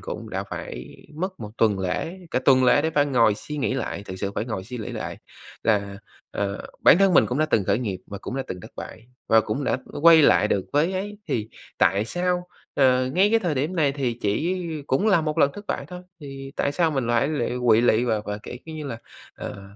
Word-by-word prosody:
cũng - - -7
đã - - -2
phải - - -7 0.2
mất 185 +4 -4
một 105 -2 -6
tuần 105 -4 +3
lễ, 95 - -3
cả - - +1
tuần 130 -1 +5
lễ 135 +3 +5
để 160 - 0
phải 145 -2 +2
ngồi 115 -6 +3
suy 150 +8 -7
nghĩ 135 -2 0
lại, 120 -5 -3
thực 95 - -7
sự 100 +1 -3
phải - - -1
ngồi 110 -6 -4
suy 125 +4 -7
nghĩ 110 - -5
lại - - -5 0.5
là, 100 -3 0 0.3
ờ, 100 0 -3
bản 170 - +7
thân 195 -2 +4
mình - - +6
cũng 125 - -2
đã 155 - +3
từng 115 -9 +1
khởi 105 - +1
nghiệp 100 -7 -3
và 100 - -7
cũng 130 - -5
đã 135 - -1
từng 90 - -6
thất - - -11
bại 115 - -9 0.2
và 110 - +6
cũng 110 +6 -3
đã, - - +1 0.2
ơ, - - -6
quay 165 0 +8
lại 100 -2 +5
được 95 - 0
với 155 +6 +2
ấy. 205 +2 -4
Thì 110 -1 -1 0.3
tại 100 +4 +3
sao, 180 +4 -1 0.3
ờ, 130 -2 +4
ngay 195 +3 +4
cái 230 - +4
thời 175 -8 -1
điểm 150 +8 -1
này 145 -4 +2
thì 125 -4 -2
chỉ 155 - 0 0.3
cũng 135 +12 +1
là 195 -5 +5
một 155 -1 -2
lần 140 - +5
thất 205 0 -10
bại - - -3
thôi, 180 +1 -8 0.2
thì 135 -1 -8
tại 140 - 0
sao 165 0 +2
mình 135 -5 -1
lại 120 +4 +2
lụy 145 -6 -1 0.2
quỵ 110 0 +6
lụy 120 0 +3
và 110 -3 0
và 105 0 -4
kiểu - - -8
kiểu 160 -1 -8
như 155 - -6
là, 115 -4 -5 0.4
ờ, 100 - -7
130 Hz, 245 wpm, -24 LUFS, 110-160 Hz, 0.5 s, quay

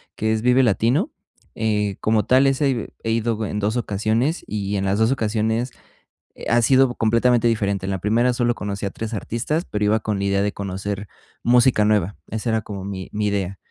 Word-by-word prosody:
que 110 0 0
es 110 -1 0
Vive 125 +2 +4
Latino, 125 - +2 0.4
eh, 105 -3 0
como 110 -1 +2
tal 130 +2 +4
ese 135 +1 +2 0.3
he 115 - -2
he - - +2
ido 115 -1 0
en 105 - -3
2 105 +2 0
ocasiones 115 - -1
y 100 -1 -2
en 95 - -1
las 100 +2 0
2 110 +2 +3
ocasiones 110 0 0 0.8
ha 120 0 +4
sido 130 +1 +4
completamente 115 +2 +3
diferente. 100 -4 0
En - - -2
la 95 - -1
primera 115 +6 +2
solo 120 -1 +1
conocí 100 -2 -4
a 100 - -2
3 115 +2 -6
artistas, 125 - -2
pero 105 0 -2
iba 110 +2 +3
con 105 -1 -2
la 100 - -1
idea 100 0 +1
de 105 - 0
conocer 100 +1 -4 0.4
música 120 -2 +4
nueva, 105 -2 +1
esa 110 +2 -3
era 110 0 +1
como 100 -3 -7
mi 95 -1 -6
mi 105 0 -1
idea. 100 -2 -2
110 Hz, 200 wpm, -22 LUFS, 100-120 Hz, 0.8 s, Vive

